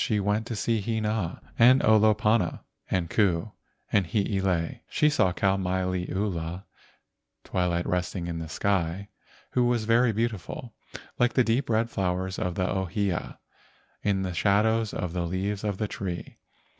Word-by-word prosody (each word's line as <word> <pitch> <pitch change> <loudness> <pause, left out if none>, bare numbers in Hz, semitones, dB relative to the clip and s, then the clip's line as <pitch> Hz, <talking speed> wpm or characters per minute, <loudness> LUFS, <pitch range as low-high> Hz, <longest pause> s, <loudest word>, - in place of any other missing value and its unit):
She 105 -2 +1
went 105 +3 0
to 115 - -3
see 110 +1 0
Hina 110 -4 -1 0.2
and 125 +3 +7
Olopana, 110 0 +3 0.3
and 90 -2 0
Ku 90 -4 +1 0.4
and 95 -4 +3
Hiilei. 95 -4 0
She 150 0 +3
saw 95 -10 +3
Kau 95 +2 +1
mai 95 0 -1
liula 90 -1 -2 0.8
(twilight 90 -1 0
resting 90 0 -2
in 85 -1 -4
the 80 -1 -6
sky), 95 +2 -1 0.4
who 125 - +2
was 120 -2 +1
very 115 +2 +4
beautiful, 115 +1 -3 0.5
like 120 0 +3
the 130 - +4
deep 120 +3 0
red 115 +1 +1
flowers 95 -1 -1
of 90 -1 -2
the 95 -1 0
ohia 95 -1 -2 0.6
in 100 -2 +1
the 90 -1 -3
shadows 110 +4 +2
of 90 -3 -3
the 85 -1 -1
leaves 95 +3 -2
of 105 -3 -1
the 105 - -1
tree. 90 -4 -6
100 Hz, 150 wpm, -27 LUFS, 90-110 Hz, 0.8 s, and